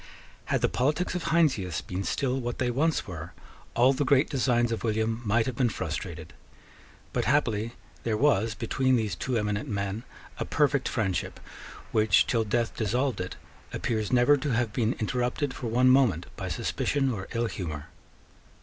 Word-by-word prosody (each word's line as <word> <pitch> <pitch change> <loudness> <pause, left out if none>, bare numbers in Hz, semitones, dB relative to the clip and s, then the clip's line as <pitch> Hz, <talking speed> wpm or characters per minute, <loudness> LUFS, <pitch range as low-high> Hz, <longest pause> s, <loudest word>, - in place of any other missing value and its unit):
Had - - 0
the - - +4
politics 150 +8 0
of 180 -2 -3
Heinsius 130 - +2
been 95 +1 -4
still 130 +7 0
what 120 -1 -3
they 125 -1 0
once 155 +6 +1
were, 85 -2 -7 0.4
all 125 +3 +5
the 140 - 0
great 140 +1 +3
designs 120 -4 +2
of 115 - -3
William 110 0 0
might 115 +1 +2
have 130 - -3
been 125 -1 +2
frustrated. 80 -3 -5 0.8
But - - 0
happily 115 -5 +1 0.3
there 110 -2 -1
was 115 -5 +2
between 130 +3 +1
these 110 -5 0
two 120 +8 -2
eminent 105 -1 -1
men 100 +1 -2 0.4
a - - 0
perfect 140 -3 +1
friendship 95 -6 -2 0.5
which, 110 -1 +4
till 115 -2 +1
death 115 +2 -1
dissolved 120 +3 0
it, 90 - -5 0.4
appears 110 -3 -1
never 125 +4 +5
to 145 +1 -3
have 115 -2 0
been 115 0 +1
interrupted 125 +5 -1
for 120 - -5
one 125 +3 +4
moment 120 - +3
by - - -5
suspicion 135 -2 0
or 95 -5 -5
ill 115 0 0
humour. 80 -10 -5
120 Hz, 170 wpm, -28 LUFS, 105-130 Hz, 0.8 s, all